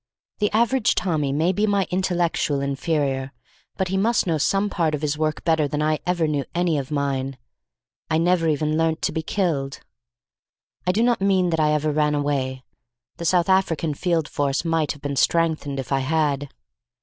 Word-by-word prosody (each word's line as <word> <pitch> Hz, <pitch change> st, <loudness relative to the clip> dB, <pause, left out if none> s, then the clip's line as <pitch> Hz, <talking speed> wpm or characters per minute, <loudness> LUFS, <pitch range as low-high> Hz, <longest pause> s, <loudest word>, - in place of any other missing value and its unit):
The 210 Hz, -1 st, +2 dB
average 235 Hz, +2 st, +2 dB
Tommy 155 Hz, -6 st, 0 dB
may 160 Hz, +6 st, +2 dB
be 205 Hz, +3 st, 0 dB
my 200 Hz, -2 st, +2 dB
intellectual 175 Hz, -5 st, 0 dB
inferior, 140 Hz, -1 st, -1 dB, 0.5 s
but 190 Hz, -2 st, -1 dB
he 190 Hz, -, 0 dB
must 225 Hz, +4 st, +2 dB
know 165 Hz, -4 st, 0 dB
some 195 Hz, +7 st, +1 dB
part 165 Hz, -6 st, 0 dB
of 150 Hz, -, -7 dB
his 150 Hz, 0 st, 0 dB
work 155 Hz, 0 st, -2 dB
better 160 Hz, -3 st, +2 dB
than 150 Hz, +1 st, -3 dB
I 155 Hz, 0 st, +1 dB
ever 175 Hz, -3 st, +1 dB
knew 145 Hz, -2 st, 0 dB
any 170 Hz, -3 st, +1 dB
of 135 Hz, -, -6 dB
mine. 135 Hz, -2 st, -2 dB, 0.7 s
I 160 Hz, -, +2 dB
never 165 Hz, 0 st, +2 dB
even 155 Hz, 0 st, 0 dB
learnt 165 Hz, 0 st, 0 dB
to -, -, +1 dB
be 160 Hz, -, -2 dB
killed. 155 Hz, -6 st, -2 dB, 1.1 s
I -, -, +5 dB
do 215 Hz, +5 st, +1 dB
not 240 Hz, -3 st, +2 dB
mean 190 Hz, -3 st, +2 dB
that 160 Hz, -, 0 dB
I 150 Hz, -1 st, +3 dB
ever 150 Hz, 0 st, +1 dB
ran 150 Hz, 0 st, +1 dB
away. 135 Hz, -3 st, -1 dB, 0.5 s
The 170 Hz, -, -5 dB
South 175 Hz, 0 st, +3 dB
African 170 Hz, -5 st, +1 dB
Field 165 Hz, 0 st, 0 dB
Force 140 Hz, +2 st, -1 dB
might 165 Hz, -3 st, +1 dB
have 145 Hz, -, -17 dB
been 140 Hz, -1 st, -2 dB
strengthened 160 Hz, -4 st, +1 dB
if 135 Hz, -, -6 dB
I 135 Hz, -, +2 dB
had. 145 Hz, 0 st, 0 dB
155 Hz, 185 wpm, -23 LUFS, 145-180 Hz, 1.1 s, I